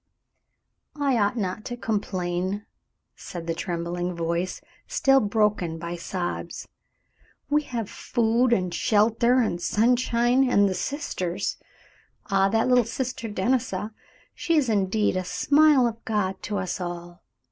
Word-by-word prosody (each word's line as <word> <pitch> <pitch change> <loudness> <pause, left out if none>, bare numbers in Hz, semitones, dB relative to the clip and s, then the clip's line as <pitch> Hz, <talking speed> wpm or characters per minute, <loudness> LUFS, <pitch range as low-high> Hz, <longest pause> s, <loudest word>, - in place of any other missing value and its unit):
"I 280 -3 +2
ought 205 +4 +1
not 200 0 -2
to 245 - -5
complain," 190 -2 -2 0.5
said 170 -2 -8
the 165 - -1
trembling 175 +1 -3
voice, 170 +2 -2 0.3
still 270 0 +4
broken 210 -6 0
by 170 +1 -5
sobs. 175 +1 -4 0.8
"We 300 +1 +4
have 230 -6 -3
food 235 +2 +1
and 185 -6 +1
shelter 230 +6 +3
and 175 -7 -1
sunshine 240 +4 +2
and 205 -4 +4
the 190 - -1
sisters. 185 - -3 0.7
Ah, 195 0 +4
that 225 +3 +2
little 250 -1 +5
Sister 235 -1 -4
Denisa, 210 -1 -1 0.4
she 335 -1 0
is 270 -5 +2
indeed 210 -1 +1
a 185 - -1
smile 290 +6 +4
of 230 -1 -3
God 205 -4 -1
to 210 - -3
us 185 -1 -3
all. 175 0 -6
210 Hz, 130 wpm, -25 LUFS, 180-240 Hz, 0.8 s, little